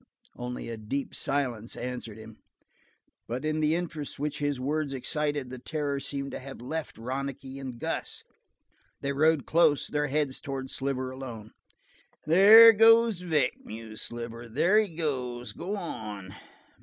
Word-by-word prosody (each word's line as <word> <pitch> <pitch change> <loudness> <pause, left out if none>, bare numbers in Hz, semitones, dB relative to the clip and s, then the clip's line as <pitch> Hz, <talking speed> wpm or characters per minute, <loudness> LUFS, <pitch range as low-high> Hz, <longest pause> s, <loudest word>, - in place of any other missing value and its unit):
Only 125 0 -5
a 115 -1 -5
deep 110 +6 -4
silence 125 -5 -1
answered 120 -3 -5
him, 110 0 -12 0.9
but 125 +5 -4
in 155 0 0
the 155 +1 +2
interest 165 -4 -4
which 150 +1 -3
his 145 -2 -1
words 145 +2 -1
excited 145 0 -2
the 130 - -7
terror 145 +1 -2
seemed 140 0 -4
to - - -5
have 135 +1 -9
left 155 +6 -5
Ronicky 135 +2 -5
and 130 -3 -6
Gus. - - -3 0.8
They 140 0 -1
rode 155 0 +3
close, 155 -3 +3
their 150 0 0
heads 145 -1 -1
toward 135 -1 -5
Sliver 130 -1 -2
alone. 120 -5 -8 0.7
"There 210 +8 +9
goes 225 -2 +5
Vic," 150 -8 +1
mused 110 0 -7
Sliver. 120 0 -5
"There 175 - +4
he 200 -7 -1
goes 125 -7 -3
go 195 - -4
on. 105 - -6
140 Hz, 145 wpm, -28 LUFS, 125-155 Hz, 0.9 s, There